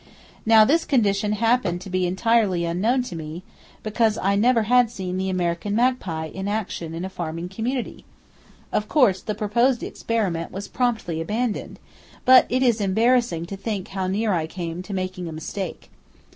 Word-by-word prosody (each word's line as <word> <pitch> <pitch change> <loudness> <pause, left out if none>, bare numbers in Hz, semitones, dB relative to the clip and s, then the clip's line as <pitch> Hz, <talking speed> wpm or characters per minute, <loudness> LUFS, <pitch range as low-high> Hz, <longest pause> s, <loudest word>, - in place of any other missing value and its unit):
Now, 220 -1 +7
this 325 +7 +3
condition 210 -6 +1
happened 220 -5 +1
to 190 - -8
be 185 0 +1
entirely 190 -2 +2
unknown 215 +10 +1
to 190 - -7
me, 160 +2 -7 0.4
because 215 0 +1
I 195 +1 +1
never 230 +2 +3
had 245 +1 +4
seen 190 -5 -5
the 190 0 -1
American 180 +2 -1
magpie 225 -10 0
in 190 +1 -4
action 195 -6 -3
in 170 +3 -4
a - - -2
farming 170 -1 -5
community! 235 +6 -4 0.7
Of 210 - -1
course 210 - +3
the 215 - -4
proposed 235 +4 +1
experiment 195 -8 -2
was 195 +2 -6
promptly 225 -10 -1
abandoned, 215 +5 -2 0.5
but 255 0 +7
it 255 +1 +1
is 235 -4 +2
embarrassing 220 -3 +2
to 195 - -6
think 200 -1 -4
how 190 -1 -3
near 205 +2 0
I 160 -3 0
came 170 0 -5
to 185 - -9
making 185 -1 -4
a - - -5
mistake. 165 +3 -6
200 Hz, 170 wpm, -23 LUFS, 180-230 Hz, 0.7 s, Now